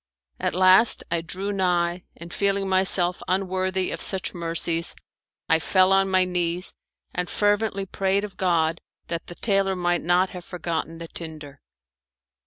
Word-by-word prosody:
At - - -2
last 185 +5 +6
I 170 -1 +1
drew 185 +5 -4
nigh, 180 -2 0
and 170 +1 -10
feeling 200 -1 0
myself 185 -1 +4
unworthy 185 0 -1
of - - -5
such 190 -1 -1
mercies 170 -1 0 0.5
I 160 - +3
fell 185 +3 +3
on 195 0 +3
my 185 -1 +3
knees 180 0 -2 0.4
and 180 0 -3
fervently 205 -1 0
prayed 195 +1 0
of 205 -3 -7
God 165 -3 0 0.3
that 170 -1 -4
the 175 - -9
tailor 195 -2 +1
might 175 -1 0
not 180 +3 +2
have 180 -1 -8
forgotten 165 -2 -4
the 165 0 -8
tinder. 155 -4 -9
180 Hz, 150 wpm, -24 LUFS, 170-190 Hz, 0.5 s, last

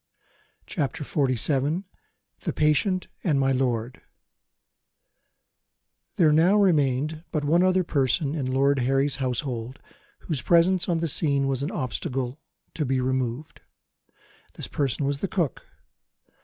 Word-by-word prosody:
CHAPTER 150 -4 -3
XLVII 140 - 0 0.6
THE - - -3
PATIENT 180 +5 +2 0.2
AND 150 -6 +2
MY 135 0 +2
LORD 125 -2 -1 2.1
THERE 155 -4 +4
now 175 +7 +4
remained 155 -4 +1
but 155 -3 -1
one 165 +4 +3
other 185 0 +3
person 140 -1 0
in 135 -5 -2
Lord 135 +1 +2
Harry's 135 +3 +1
household 125 -2 -3 0.4
whose 150 -6 -3
presence 175 +4 +3
on 170 - +2
the 165 0 -1
scene 140 -2 +1
was 135 -1 -1
an 140 - -2
obstacle 130 +2 -3 0.3
to 155 - -2
be 135 -1 0
removed. 130 +2 -2 0.9
This - - -6
person 140 -1 -1
was 140 0 -1
the 195 - -2
cook. 170 -8 -2
140 Hz, 125 wpm, -25 LUFS, 130-160 Hz, 2.1 s, THERE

